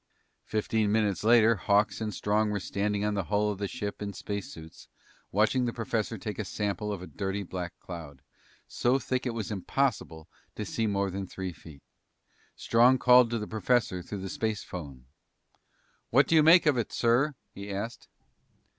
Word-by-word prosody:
Fifteen 110 -1 0
minutes 105 -5 +1
later, 115 0 +5
Hawks 100 +2 +1
and 110 -1 -2
Strong 105 +1 0
were 105 -1 -1
standing 100 +2 -1
on 105 - 0
the 100 -3 -2
hull 105 +2 +1
of 100 - -6
the 100 - -1
ship 105 0 -5
in 100 -1 -4
space 100 +1 -5
suits, 80 0 -12 0.4
watching 110 +5 +2
the 120 - -2
professor 115 -2 -2
take 110 -6 -6
a - - 0
sample 105 +1 -3
of 95 -3 -5
a - - -6
dirty 95 +5 -3
black 90 -1 -5
cloud, 75 -6 -9 0.4
so 125 +2 +1
thick 130 -1 -2
it 120 - -2
was 110 -1 -4
impossible 100 - -2 0.3
to 105 - -4
see 110 +3 -1
more 100 -1 0
than 95 +1 -4
three 95 -1 -5
feet. 75 -4 -14 0.7
Strong 120 +3 +4
called 125 -1 +6
to 120 - -1
the 105 - -4
professor 110 -3 0
through 100 +2 -7
the 95 - -5
spacephone. 90 - -5 1.0
"What 135 +3 +5
do - - +1
you 160 - +7
make 165 +3 +7
of 150 -4 +3
it, 115 - -3
sir?" 125 +5 +2 0.2
he 100 +1 -8
asked. 105 +4 -5
105 Hz, 180 wpm, -28 LUFS, 95-115 Hz, 1.0 s, you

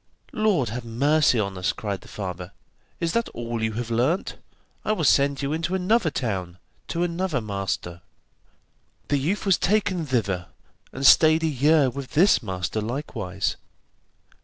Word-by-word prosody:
'Lord 200 - +1
have 120 +3 -5
mercy 135 +3 +2
on 100 -2 -2
us!' 90 - +1
cried 100 -3 -4
the - - -15
father; 90 -2 -6 0.5
'is 165 0 -1
that 235 0 0
all 120 -1 -4
you 110 0 -1
have 115 +1 -4
learnt? 130 +11 0 0.5
I 215 - +1
will 175 - -2
send 140 0 +3
you 140 +2 -1
into 165 +3 -1
another 190 0 +2
town, 95 - -3 0.3
to 170 - -1
another 175 -3 -1
master.' 95 -5 -4 1.1
The 145 - +2
youth 180 +11 -1
was 195 -3 +3
taken 190 -4 +1
thither, 100 -9 -1 0.4
and 135 - -4
stayed 155 +4 +6
a - - +3
year 145 -1 +3
with 135 +1 -8
this 180 +2 +5
master 95 0 -3
likewise. 105 -6 -3
135 Hz, 155 wpm, -24 LUFS, 105-165 Hz, 1.1 s, stayed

